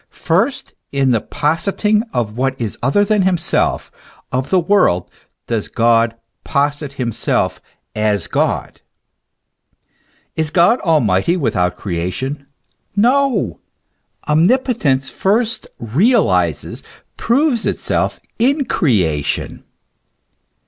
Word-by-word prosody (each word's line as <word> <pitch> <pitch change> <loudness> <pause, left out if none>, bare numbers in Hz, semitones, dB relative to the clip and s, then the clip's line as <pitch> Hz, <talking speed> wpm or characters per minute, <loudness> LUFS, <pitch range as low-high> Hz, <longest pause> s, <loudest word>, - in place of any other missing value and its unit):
First 195 +11 0 0.2
in 135 -2 +1
the 115 -3 +2
positing 195 +8 0
of 110 -3 -2
what 130 +1 -1
is 115 -4 -3
other 170 +12 +2
than 210 0 +2
himself, 180 -3 0 0.4
of 130 +1 -2
the 190 - +3
world, 170 - +2 0.3
does 115 -3 -2
God 115 0 +2 0.3
posit 145 0 -1
himself 120 -5 -1 0.3
as 105 -3 0
God. - - -2 1.5
Is 160 -1 -1
God 175 +9 +4
almighty 155 - +2
without 90 - 0
creation? 105 - -4 0.5
No! 260 +5 +2 0.7
Omnipotence 160 - +2
first 220 +4 0
realizes, 115 - +1 0.3
proves 250 0 +1
itself - - -1 0.2
in 275 +4 +2
creation. 90 - 0
145 Hz, 95 wpm, -17 LUFS, -, 1.5 s, God